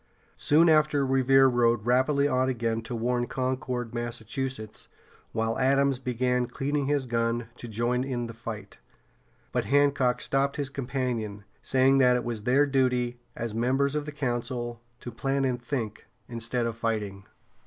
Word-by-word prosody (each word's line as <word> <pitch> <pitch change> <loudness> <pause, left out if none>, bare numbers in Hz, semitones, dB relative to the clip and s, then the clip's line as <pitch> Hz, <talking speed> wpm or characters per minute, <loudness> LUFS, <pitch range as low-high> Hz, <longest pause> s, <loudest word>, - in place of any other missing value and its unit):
Soon 160 +3 +4
after 150 -3 +4
Revere 135 0 +4
rode 120 -3 +2
rapidly 130 +4 +3
on 130 -1 +1
again 115 -2 -1
to 115 +2 -6
warn 120 +1 0
Concord, 130 -2 -2
Massachusetts, 120 -1 -4 0.4
while 115 0 -1
Adams 135 0 +3
began 125 -1 0
cleaning 140 +1 -2
his 145 -2 +1
gun 115 -1 -1
to 120 - -8
join 120 +3 0
in 125 -3 -3
the 115 - -7
fight. 110 -1 -8 0.7
But - - -1
Hancock 140 -3 +3
stopped 140 +1 0
his 140 -2 -2
companion, 120 -6 -3 0.2
saying 135 +1 +3
that 125 -1 +5
it 125 - -1
was 115 -3 -4
their 135 +4 +4
duty, 125 -3 +1 0.2
as 115 -2 -4
members 135 +5 +1
of 150 -1 -2
the - - -4
Council, 120 -4 -3 0.2
to 120 - -6
plan 135 +4 -1
and 125 -2 -1
think, 120 -4 -4 0.2
instead 115 +1 -2
of 115 -1 -2
fighting. 105 -4 -3
125 Hz, 155 wpm, -27 LUFS, 115-135 Hz, 0.7 s, that